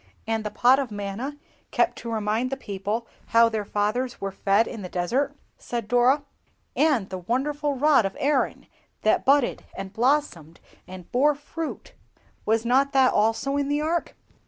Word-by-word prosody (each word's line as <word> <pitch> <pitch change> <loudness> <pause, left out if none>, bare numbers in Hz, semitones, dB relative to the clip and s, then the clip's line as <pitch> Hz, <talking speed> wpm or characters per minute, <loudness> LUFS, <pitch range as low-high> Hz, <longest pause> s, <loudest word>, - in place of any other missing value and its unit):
"And 225 -1 -1
the 210 - -3
Pot 250 +5 +4
of 270 -3 -2
Manna, 205 +7 -5 0.3
kept - - +1
to 235 - -6
remind 220 +3 0
the 270 - -3
people 205 0 -4 0.2
how 230 0 +5
their 220 -2 -2
fathers 215 +5 -1
were 195 0 -3
fed 200 +3 +2
in 225 - -7
the 180 - -6
desert?" 255 +12 -1 0.2
said 235 -3 -4
Dora. 245 +5 +3 0.5
"And 270 -12 +2
the 185 - -4
wonderful 285 - -1
rod 290 -2 +4
of 195 - -10
Aaron, 285 -2 0 0.4
that - - +2
budded, 275 -1 +3 0.2
and 195 0 -6
blossomed, 230 - 0 0.3
and 185 -2 -11
bore 290 +4 +3
fruit; 310 +2 -7 0.5
was 225 +1 +2
not 270 +3 +2
that 265 -1 +4
also 225 +6 +1
in 285 -1 0
the 290 +1 0
Ark?" 330 +2 -1
240 Hz, 165 wpm, -25 LUFS, 210-280 Hz, 0.5 s, how